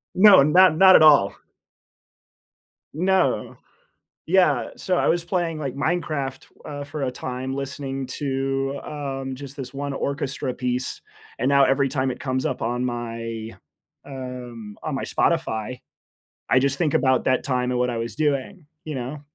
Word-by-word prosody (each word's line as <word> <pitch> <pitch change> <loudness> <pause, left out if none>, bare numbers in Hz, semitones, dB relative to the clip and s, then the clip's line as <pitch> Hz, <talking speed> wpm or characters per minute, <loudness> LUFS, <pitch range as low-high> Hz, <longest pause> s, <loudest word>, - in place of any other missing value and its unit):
No. 195 -6 +8
Not 180 +3 +6
not 190 0 +8
at - - +7
all. 145 -10 +6 1.6
No. 185 +3 +1 0.7
Yeah. 155 -9 +3
So 185 -1 -1
I - - +1
was 170 0 +1
playing, 175 -3 -1
like, 135 -4 -4
Minecraft, 150 -3 -2 0.2
uh, 145 -1 -6
for 145 0 -6
a 130 - 0
time 130 +1 -5
listening 135 -1 -4
to, 135 0 -2
um, 135 -3 -5
just 140 +1 -9
this 135 -1 -7
1 140 0 -3
orchestra 140 -2 -3
piece, 125 0 -2 0.4
and 125 +3 +1
now 140 -1 +5
every 135 +1 +2
time 130 -1 -1
it - - -6
comes 130 -1 -1
up 130 - -3
on 120 +2 -1
my, 115 -2 -4 0.5
um, 125 -5 -8
on 155 - -3
my 135 - -3
Spotify, 125 -8 -1 0.7
I 130 - +5
just 140 +1 0
think 160 -5 +1
about 130 -1 +2
that 130 -1 +1
time 125 -3 0
and 125 - 0
what 125 0 +1
I 115 - -3
was 115 +1 -5
doing, 150 +3 -1 0.2
you 155 - -5
know? 130 +4 -5
135 Hz, 160 wpm, -23 LUFS, 125-150 Hz, 1.6 s, No